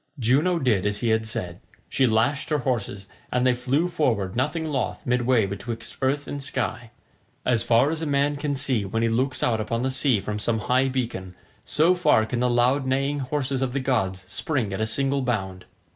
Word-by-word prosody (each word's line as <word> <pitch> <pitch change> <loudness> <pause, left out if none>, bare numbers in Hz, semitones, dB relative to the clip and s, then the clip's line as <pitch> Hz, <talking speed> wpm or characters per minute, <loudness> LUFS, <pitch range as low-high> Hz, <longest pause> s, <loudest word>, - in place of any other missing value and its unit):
Juno 140 +9 +2
did 110 - +1
as 105 0 -2
he 120 - +1
had 110 0 +1
said. 100 -7 -5 0.3
She 130 - +2
lashed 130 +7 +1
her 150 - +2
horses, 110 -7 -3 0.2
and 125 +1 +1
they 130 - +4
flew 135 +7 0
forward 115 - 0
nothing 150 +6 -1
loth 150 -3 -3
midway 125 -2 +2
betwixt 110 +3 -6
earth 140 +2 0
and 145 - -5
sky. 120 -3 -3 0.6
As 120 -3 +2
far 120 +5 +3
as 160 0 -3
a 160 - -2
man 140 +1 +1
can 145 -1 -2
see 130 -5 +1
when 110 +4 -2
he 115 - +2
looks 130 +4 0
out 110 -2 +1
upon 115 +2 -2
the 130 - 0
sea 130 -4 +2
from 105 +2 -4
some 110 +1 0
high 130 +4 +2
beacon, 115 -8 -3 0.3
so 165 +4 +3
far 180 -11 +3
can 120 +2 -3
the 125 0 +2
loud 125 +3 +2
neighing 135 +2 0
horses 135 0 -2
of 130 -2 -1
the 140 - 0
gods 105 -9 -1
spring 115 -1 -1
at 95 - -3
a 110 - +1
single 135 +4 0
bound. 95 -7 -3
125 Hz, 205 wpm, -24 LUFS, 110-140 Hz, 0.6 s, they